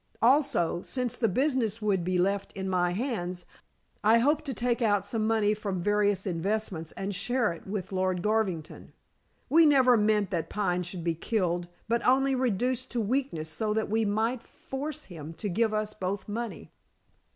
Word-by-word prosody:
Also 245 Hz, -, +3 dB
since 250 Hz, +1 st, -2 dB
the 225 Hz, -, +1 dB
business 250 Hz, -2 st, +1 dB
would 200 Hz, -5 st, +1 dB
be 180 Hz, +1 st, 0 dB
left 195 Hz, +2 st, 0 dB
in 190 Hz, -1 st, -4 dB
my 180 Hz, -1 st, +2 dB
hands 180 Hz, -4 st, -3 dB, 0.6 s
I 220 Hz, +2 st, +6 dB
hoped 295 Hz, +6 st, +2 dB
to 275 Hz, -, -3 dB
take 240 Hz, +1 st, 0 dB
out 205 Hz, -3 st, +2 dB
some 215 Hz, +1 st, -1 dB
money 215 Hz, -2 st, +3 dB
from 200 Hz, -4 st, -3 dB
various 205 Hz, -1 st, +2 dB
investments, 185 Hz, -2 st, -2 dB
and 195 Hz, +1 st, -4 dB
share 215 Hz, +1 st, 0 dB
it 170 Hz, -, -13 dB
with 190 Hz, -1 st, -4 dB
Lord 185 Hz, -1 st, 0 dB
Garvington. 210 Hz, -7 st, -1 dB, 0.5 s
We 325 Hz, +5 st, +6 dB
never 260 Hz, -4 st, +6 dB
meant 210 Hz, -2 st, +2 dB
that 165 Hz, -2 st, -2 dB
Pine 180 Hz, -4 st, 0 dB
should 175 Hz, 0 st, -6 dB
be 170 Hz, 0 st, +1 dB
killed, 175 Hz, -1 st, -1 dB, 0.2 s
but 235 Hz, +1 st, +1 dB
only 270 Hz, +2 st, +3 dB
reduced 255 Hz, +1 st, 0 dB
to 240 Hz, -, 0 dB
weakness 220 Hz, -, -1 dB
so 215 Hz, +2 st, -1 dB
that 220 Hz, -1 st, -1 dB
we 225 Hz, +1 st, +2 dB
might 220 Hz, +4 st, 0 dB
force 275 Hz, +4 st, -6 dB
him 165 Hz, -3 st, -9 dB
to 205 Hz, -, -4 dB
give 220 Hz, +4 st, +1 dB
us 215 Hz, 0 st, -2 dB
both 190 Hz, -1 st, -4 dB
money." 230 Hz, +2 st, -5 dB
210 Hz, 175 wpm, -28 LUFS, 185-235 Hz, 0.6 s, I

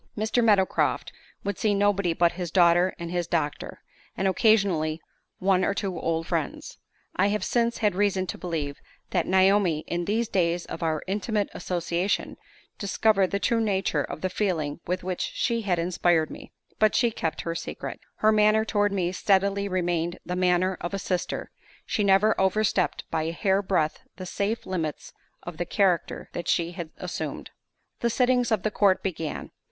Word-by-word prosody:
Mr. 220 Hz, +3 st, +1 dB
Meadowcroft 205 Hz, -4 st, +2 dB, 0.3 s
would 200 Hz, -1 st, -3 dB
see 210 Hz, -2 st, +2 dB
nobody 200 Hz, -3 st, +2 dB
but 170 Hz, +1 st, +3 dB
his 175 Hz, -1 st, -5 dB
daughter 175 Hz, +1 st, +4 dB
and 170 Hz, -1 st, -6 dB
his 175 Hz, -1 st, -1 dB
doctor, 150 Hz, -4 st, -2 dB, 0.3 s
and 195 Hz, -, +1 dB
occasionally 185 Hz, -6 st, +2 dB, 0.4 s
one 185 Hz, -1 st, +2 dB
or 200 Hz, -, +1 dB
two 195 Hz, -3 st, -2 dB
old 165 Hz, 0 st, -1 dB
friends. 165 Hz, -4 st, -3 dB, 0.4 s
I 190 Hz, -, +3 dB
have 210 Hz, +1 st, -1 dB
since 235 Hz, -1 st, +1 dB
had 210 Hz, -3 st, +1 dB
reason 195 Hz, -1 st, +1 dB
to -, -, -5 dB
believe 155 Hz, -5 st, -3 dB, 0.3 s
that 175 Hz, -4 st, 0 dB
Naomi, 190 Hz, -3 st, +3 dB
in 175 Hz, 0 st, -2 dB
these 220 Hz, +4 st, 0 dB
days 175 Hz, -2 st, 0 dB
of -, -, -7 dB
our 160 Hz, -2 st, -1 dB
intimate 205 Hz, +2 st, -1 dB
association, 175 Hz, +2 st, -2 dB, 0.4 s
discovered 200 Hz, -1 st, +2 dB
the 200 Hz, -, 0 dB
true 230 Hz, +3 st, +1 dB
nature 190 Hz, -8 st, +1 dB
of 155 Hz, -, -7 dB
the 185 Hz, -, 0 dB
feeling 165 Hz, -8 st, -1 dB
with 180 Hz, +1 st, -2 dB
which 185 Hz, -1 st, -3 dB
she 235 Hz, -1 st, 0 dB
had 190 Hz, -5 st, 0 dB
inspired 170 Hz, -2 st, +1 dB
me. -, -, -10 dB, 0.3 s
But 215 Hz, -1 st, +4 dB
she 235 Hz, -2 st, +3 dB
kept 165 Hz, -7 st, -3 dB
her 165 Hz, -, -3 dB
secret. 165 Hz, -, -6 dB, 0.2 s
Her 215 Hz, -, +3 dB
manner 215 Hz, 0 st, +4 dB
toward 205 Hz, -2 st, +1 dB
me 180 Hz, -3 st, 0 dB
steadily 200 Hz, +1 st, +1 dB
remained 175 Hz, -2 st, -1 dB
the 180 Hz, -, -3 dB
manner 180 Hz, 0 st, +2 dB
of 175 Hz, +3 st, -3 dB
a -, -, -1 dB
sister; 180 Hz, -2 st, -3 dB, 0.3 s
she 210 Hz, -, 0 dB
never 200 Hz, +2 st, +4 dB
overstepped 190 Hz, -1 st, +1 dB
by 160 Hz, -, 0 dB
a 160 Hz, +1 st, -2 dB
hair 195 Hz, +2 st, +1 dB
breadth 180 Hz, -6 st, 0 dB, 0.2 s
the 185 Hz, -, -7 dB
safe 205 Hz, +5 st, -2 dB
limits 165 Hz, -5 st, -4 dB, 0.3 s
of 175 Hz, -2 st, -7 dB
the 175 Hz, -, -2 dB
character 185 Hz, -3 st, +1 dB
that 170 Hz, -, -5 dB
she 170 Hz, -1 st, +1 dB
had 170 Hz, -3 st, -6 dB
assumed. -, -, -5 dB, 0.5 s
The 235 Hz, -, +1 dB
sittings 245 Hz, 0 st, +2 dB
of 215 Hz, -4 st, +1 dB
the 215 Hz, -, 0 dB
court 200 Hz, -2 st, +3 dB
began. 165 Hz, -5 st, -4 dB
185 Hz, 175 wpm, -26 LUFS, 170-205 Hz, 0.5 s, daughter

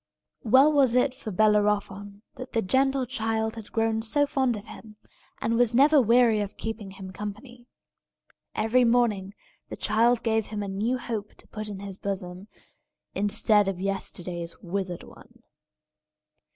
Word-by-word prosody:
Well 265 Hz, +7 st, +5 dB
was 265 Hz, -4 st, +3 dB
it 250 Hz, +1 st, +3 dB
for 255 Hz, -4 st, -8 dB
Bellerophon 205 Hz, 0 st, 0 dB
that 255 Hz, 0 st, -10 dB
the 225 Hz, -, +1 dB
gentle 265 Hz, +5 st, +1 dB
child 225 Hz, -3 st, -2 dB
had 220 Hz, -2 st, -10 dB
grown 225 Hz, 0 st, 0 dB
so 290 Hz, +6 st, +1 dB
fond 260 Hz, -5 st, 0 dB
of 205 Hz, -, -10 dB
him, 215 Hz, -1 st, -12 dB, 0.4 s
and 230 Hz, +1 st, 0 dB
was 240 Hz, -1 st, +3 dB
never 285 Hz, +3 st, +6 dB
weary 235 Hz, -1 st, +4 dB
of 205 Hz, -1 st, -4 dB
keeping 220 Hz, -3 st, -5 dB
him 190 Hz, -1 st, -9 dB
company. 215 Hz, +5 st, -8 dB, 0.9 s
Every 225 Hz, +4 st, +2 dB
morning 225 Hz, -5 st, +1 dB, 0.3 s
the -, -, -7 dB
child 230 Hz, +2 st, +2 dB
gave 220 Hz, -2 st, 0 dB
him 210 Hz, -1 st, -4 dB
a -, -, -5 dB
new 210 Hz, +6 st, -1 dB
hope 220 Hz, -4 st, -5 dB
to -, -, -14 dB
put 215 Hz, 0 st, -7 dB
in 200 Hz, -1 st, -7 dB
his 195 Hz, -1 st, -7 dB
bosom, 190 Hz, -1 st, -5 dB, 0.7 s
instead 205 Hz, 0 st, +3 dB
of 195 Hz, -2 st, -2 dB
yesterday's 180 Hz, -3 st, -4 dB
withered 185 Hz, -1 st, -4 dB
one. -, -, -17 dB
220 Hz, 150 wpm, -26 LUFS, 200-240 Hz, 0.9 s, never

